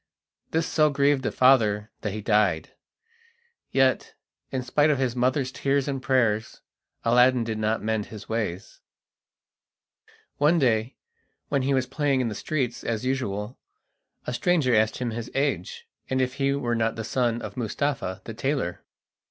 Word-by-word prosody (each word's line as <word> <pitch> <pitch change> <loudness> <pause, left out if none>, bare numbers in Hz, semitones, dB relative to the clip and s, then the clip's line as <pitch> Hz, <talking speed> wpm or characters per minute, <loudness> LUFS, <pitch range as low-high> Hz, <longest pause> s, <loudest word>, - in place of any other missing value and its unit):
This 160 0 0
so 155 -2 +3
grieved 140 -1 +2
the - - -2
father 110 -5 +3
that 105 - -2
he 105 - -4
died; 100 -7 +1 1.0
yet, 135 -1 +1 0.4
in 130 -1 -2
spite 145 +4 +2
of 150 - +2
his 130 -2 -1
mother's 130 +2 +1
tears 140 +1 0
and 135 -2 -2
prayers, 115 -5 +1 0.4
Aladdin 125 +1 +4
did 110 -1 -3
not 110 0 0
mend 110 -1 -1
his 105 -2 -10
ways. 105 -4 -4 1.6
One 150 +4 +4
day, 120 -4 +1 0.5
when 140 -2 +1
he 135 +1 +1
was 130 -1 +1
playing 145 -1 0
in 125 -2 0
the - - -4
streets 125 0 -2
as 115 +1 -2
usual, 120 -4 -2 0.7
a - - -3
stranger 155 -3 +2
asked 110 0 +2
him 125 -2 -2
his 115 +1 -5
age, 465 - -2 0.2
and 130 - 0
if 130 -1 0
he 140 0 +1
were 125 -4 -1
not 115 -1 0
the 110 - -4
son 120 0 0
of - - -7
Mustapha 120 -5 -2
the 115 - -7
tailor. 130 -6 -2
125 Hz, 160 wpm, -25 LUFS, 110-135 Hz, 1.6 s, Aladdin